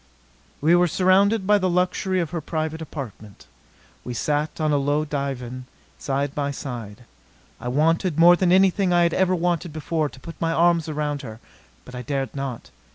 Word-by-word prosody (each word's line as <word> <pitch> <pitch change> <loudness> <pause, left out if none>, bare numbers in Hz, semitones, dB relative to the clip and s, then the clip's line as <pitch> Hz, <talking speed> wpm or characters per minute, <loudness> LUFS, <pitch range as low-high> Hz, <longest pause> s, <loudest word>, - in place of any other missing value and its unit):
We 160 +4 +4
were 175 0 +4
surrounded 190 +4 +3
by 205 +1 +4
the 185 -1 0
luxury 180 +1 0
of 170 -2 -2
her 170 -2 -3
private 160 +1 -3
apartment. 120 -9 -9 0.6
We 125 - -6
sat 150 +5 -1
on 155 -1 +1
a 145 - +3
low 145 +2 0
divan, 130 -4 -4 0.3
side 140 0 -2
by 140 -1 -2
side. 125 -5 -7 0.6
I - - -6
wanted, 160 +5 +1
more 175 +1 +7
than 175 0 +1
anything 190 0 +4
I 175 0 +4
had 170 -1 +2
ever 185 0 +2
wanted 175 -1 -1
before, 155 0 -2
to 130 - -15
put 165 +5 -11
my 165 0 +1
arms 170 -1 +2
around 150 -1 -2
her. 110 -5 -9 0.5
But 125 - -12
I 125 - -5
dared 135 +1 -3
not. 130 - -5
155 Hz, 180 wpm, -23 LUFS, 140-175 Hz, 0.6 s, more